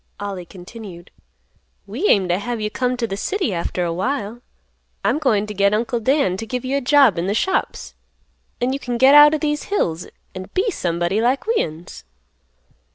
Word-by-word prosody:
Ollie 195 -3 -5
continued; 180 -1 -11 0.7
"We 245 - -2
aim 195 - +3
t' 175 - +1
have 230 +5 -3
you 210 0 -3
come 250 +1 -1
t' 240 - -1
th' 200 -3 -5
city 380 - -1
after 175 +1 -2
a 170 - -2
while. 235 +3 -3 0.6
I'm 300 - +1
goin' 220 -9 +1
t' 210 - -7
get 200 +1 +2
Uncle 235 +2 -1
Dan 245 -6 +1
t' 225 - -6
give 250 +2 -4
you 265 +2 -1
a 280 - 0
job 260 - +4
in 180 +3 -2
th' 210 - 0
shops, 380 - -2 0.7
an' 250 +2 0
you 275 - -3
can 245 -2 -3
get 265 +3 +6
out 295 +1 +8
o' - - 0
these 295 -1 -2
hills 175 - -2 0.3
an' 185 0 -8
be 420 +4 +1
somebody 175 - -1
like 250 +4 +1
we'uns." 175 - -3
225 Hz, 190 wpm, -20 LUFS, 190-275 Hz, 0.7 s, out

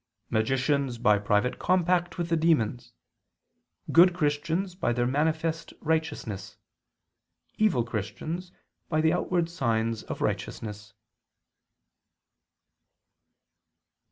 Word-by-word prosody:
Magicians 130 +3 +1
by 105 -3 +3
private 105 +4 +1
compact 180 0 +1
with 170 -1 -2
the 165 - +3
demons, 125 -7 +1 1.0
good 175 +1 +7
Christians 160 +4 0
by 180 -9 0
their 120 0 +1
manifest 160 +4 -1
righteousness, 160 - -2 1.0
evil 210 - +3
Christians 140 - -5 0.4
by 155 - +1
the 160 +1 +3
outward 175 -1 0
signs 115 -8 -1
of - - -6
righteousness." 105 -1 -4
150 Hz, 90 wpm, -27 LUFS, 115-170 Hz, 1.0 s, good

